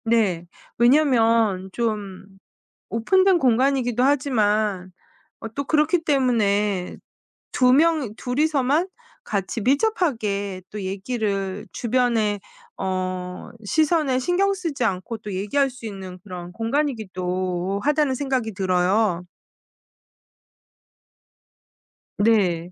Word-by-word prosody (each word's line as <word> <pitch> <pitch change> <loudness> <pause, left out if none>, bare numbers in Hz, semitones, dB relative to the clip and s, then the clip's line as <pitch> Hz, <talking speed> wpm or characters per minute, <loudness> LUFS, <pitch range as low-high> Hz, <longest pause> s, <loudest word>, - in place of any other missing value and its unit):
네. 205 -7 +1 0.3
왜냐하면 230 -7 +3
좀 210 -5 -3 0.6
오픈된 375 - +3
공간이기도 255 -2 +2
하지만 215 -9 +1 0.5
어 - - -6
또 280 - -1
그렇기 310 +3 +2
때문에 210 - +1 0.6
2 250 0 +4
명이 300 -5 +3
둘이서만 290 +5 +1 0.3
같이 205 - -3
밀접하게 230 - 0
또 210 -1 -6
얘기를 195 0 -3
주변의 230 -4 +1 0.4
어 185 -1 -4
시선에 305 - +2
신경 360 +8 +1
쓰지 335 -10 -3
않고 195 +2 -2
또 210 -2 -7
얘기할 210 +9 0
수 250 -2 -10
있는 190 -3 -8
그런 180 -3 -8
공간이기도 190 -7 -2
하다는 295 -2 +2
생각이 260 -4 -2
들어요. 185 0 +1 2.9
네. 185 -6 +2
225 Hz, 205 characters per minute, -23 LUFS, 195-275 Hz, 2.9 s, 2